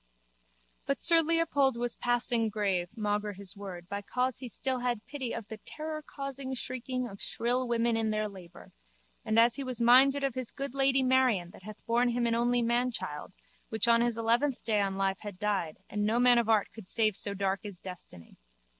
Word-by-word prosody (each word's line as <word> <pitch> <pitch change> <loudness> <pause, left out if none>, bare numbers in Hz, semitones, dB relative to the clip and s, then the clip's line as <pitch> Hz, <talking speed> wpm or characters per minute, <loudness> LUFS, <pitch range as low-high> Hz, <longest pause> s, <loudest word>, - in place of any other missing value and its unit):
But 275 0 -1
sir 335 -1 +6
Leopold 305 -6 +1
was 240 0 -1
passing 240 -2 +1
grave 195 -4 -1
maugre 210 -1 -1
his 195 0 -6
word 185 -4 -8
by 200 +1 -4
cause 250 +5 -2
he 250 -2 -7
still 260 +3 -1
had 245 -3 -2
pity 265 -5 -5
of 225 -3 -5
the 220 0 -8
terrorcausing 275 -2 -6
shrieking 255 0 -3
of 200 -3 -11
shrill 245 +2 0
women 235 -1 +1
in 225 -1 0
their 215 0 0
labour 185 -4 -13 0.5
and 220 - 0
as 230 +1 +6
he 280 - -3
was 255 -2 -5
minded 265 +4 +5
of 275 -2 0
his 255 -1 -3
good 275 -2 -5
lady 270 -1 +2
Marion 255 -9 +2
that - - -15
had 210 +2 -11
borne 240 +1 +2
him 240 0 0
an 230 - +1
only 240 +1 +2
manchild 235 -9 -2 0.4
which 220 +2 +1
on 235 0 +5
his 240 -1 0
eleventh 240 +4 +1
day 215 -3 +1
on 195 -1 -1
live 195 0 0
had 205 -3 -8
died 195 -6 -1
and 210 0 -2
no 220 +3 +1
man 245 -1 +6
of 230 -1 -1
art 215 -2 +2
could 220 -5 -11
save 215 -1 +2
so 200 +1 +2
dark 195 0 0
is 200 -4 -8
destiny. 175 - -10
235 Hz, 200 wpm, -30 LUFS, 205-255 Hz, 0.5 s, sir